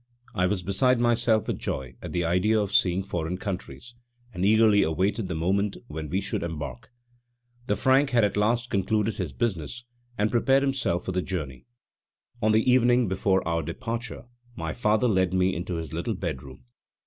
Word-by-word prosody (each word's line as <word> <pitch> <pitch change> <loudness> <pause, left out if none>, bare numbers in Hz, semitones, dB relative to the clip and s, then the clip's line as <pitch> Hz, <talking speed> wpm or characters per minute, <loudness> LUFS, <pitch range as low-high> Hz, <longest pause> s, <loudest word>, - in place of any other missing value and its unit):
I 90 0 +1
was 90 -1 -1
beside 115 +7 +2
myself 120 -2 +2
with - - -2
joy 65 -1 -4
at - - -7
the 85 -1 -1
idea 90 +6 +2
of 100 -1 -2
seeing 95 -3 +3
foreign 90 -2 -3
countries, 95 - -6 0.4
and 90 - -3
eagerly 105 0 +5
awaited 95 +6 0
the 90 - -3
moment 95 +5 0
when 80 -8 -6
we 95 +5 0
should 100 - -3
embark. 75 -7 -6 0.8
The 105 - +1
Frank 135 +6 +3
had 120 -4 +3
at 105 - +1
last 115 +4 +1
concluded 105 +2 0
his - - -3
business 120 +1 -3 0.3
and 105 +1 +1
prepared 135 +3 +3
himself 135 -11 0
for - - -2
the 90 0 0
journey. 75 -9 -5 0.7
On 110 0 +3
the 110 +2 +2
evening 125 -1 +4
before 95 0 +1
our 85 -1 0
departure 120 - -5 0.3
my - - -4
father 110 +1 +2
led 95 -4 +1
me 95 0 +2
into 90 +1 -4
his 80 -3 -5
little - - -2
bedroom. 65 0 -6
100 Hz, 175 wpm, -26 LUFS, 90-115 Hz, 0.8 s, eagerly